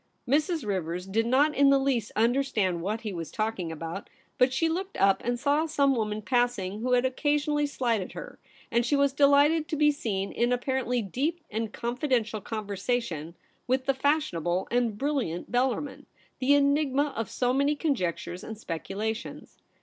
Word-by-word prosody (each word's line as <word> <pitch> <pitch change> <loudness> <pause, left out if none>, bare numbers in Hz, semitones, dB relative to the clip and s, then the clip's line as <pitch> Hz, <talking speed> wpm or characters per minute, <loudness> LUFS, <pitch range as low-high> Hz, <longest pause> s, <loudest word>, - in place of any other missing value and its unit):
Mrs. 300 +1 +1
Rivers 180 -3 -2
did 225 +4 0
not 285 +5 +3
in 280 -1 +5
the 275 - +6
least 265 -5 0
understand 220 -6 +1
what 210 +5 -2
he 215 -3 -4
was 165 -3 -5
talking 215 -6 -2
about; 165 +4 -6 0.3
but 255 +1 +5
she 295 +5 +1
looked 370 +4 -3
up 195 0 +3
and 240 0 -1
saw 290 +4 +2
some 280 -3 +2
woman 215 -3 -2
passing 240 -5 0
who 250 +1 0
had 250 +1 +3
occasionally 295 +2 +1
slighted 235 -8 -1
her, - - -9 0.3
and 235 +1 +3
she 265 +5 +1
was 280 -1 +2
de 280 0 +5
lighted 300 +3 +4
to 310 - -2
be 300 0 +4
seen 200 -9 -3
in 240 +1 +1
apparently 250 -1 0
deep 290 - -2
and 220 0 -2
con 235 +2 -3
fidential 235 -7 0
conversation 200 -6 -3 0.3
with 260 +1 +1
the 275 - +2
fashionable 260 - 0
and 235 -3 +1
brilliant 265 - -2
Bellarmin, 260 +3 -1 0.3
the 275 +2 +4
enigma 285 0 +2
of 225 - -3
so 250 0 0
many 280 +2 +2
conjectures 185 - -2
and 220 - -7
speculations. 215 +4 -5
245 Hz, 170 wpm, -27 LUFS, 210-280 Hz, 0.3 s, the